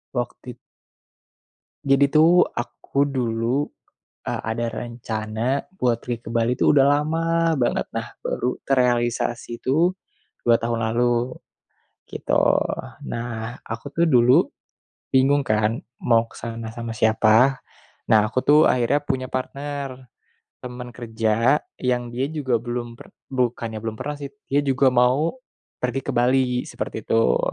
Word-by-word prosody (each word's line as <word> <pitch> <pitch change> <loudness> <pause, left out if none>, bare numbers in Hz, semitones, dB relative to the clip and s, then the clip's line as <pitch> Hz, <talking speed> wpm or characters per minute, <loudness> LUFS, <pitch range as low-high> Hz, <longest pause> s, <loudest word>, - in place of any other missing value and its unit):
Waktit 120 0 -4 1.3
Jadi 140 0 +4
tuh, 160 +4 +6
aku 140 +3 -2
dulu, 125 0 -1 0.6
eee, - - -2
ada 120 +1 -2
rencana 115 +2 -3
buat 120 -5 +1
pergi 120 -1 -5
ke - - -6
Bali 115 +2 +1
tuh - - +4
udah 135 -2 +5
lama 165 +2 +1
banget, 120 - +1
nah, - - -3 0.2
baru 125 - -1
terealisasi 120 -2 0
tuh 165 +7 +2 0.5
2 120 -1 +4
tahun 115 0 -2
lalu, 120 +2 0 0.7
gitu. - - -1 0.7
Nah, 115 0 -5
aku 115 +4 -6
tuh 170 +3 +1
dulu 125 -4 +5 0.7
bingung 135 +2 +4
kan, 110 0 +1 0.2
mau 115 -1 +3
ke - - -16
sana 115 -1 -6
sama 115 -1 -4
siapa. 110 +4 +4 0.5
Nah, 110 -1 +5
aku 130 - 0
tuh 150 +1 +6
akhirnya 125 +4 +2
punya 130 -2 -2
partner, 135 -1 -5 0.5
temen 125 0 -7
kerja 115 +3 +1 0.2
yang 125 -1 -1
dia 130 +3 0
juga 130 -6 0
belum 120 0 -5
per - - -15 0.2
bukannya 120 -3 -1
belum 110 0 -3
pernah 150 0 -3
sih, 140 -1 -6 0.2
dia 140 +1 +3
juga 135 0 +3
mau 130 - +2 0.4
pergi 125 +2 -1
ke - - -5
Bali, 125 +1 +2
seperti - - -6
itu. 115 0 +3
125 Hz, 130 wpm, -23 LUFS, 115-135 Hz, 1.3 s, tuh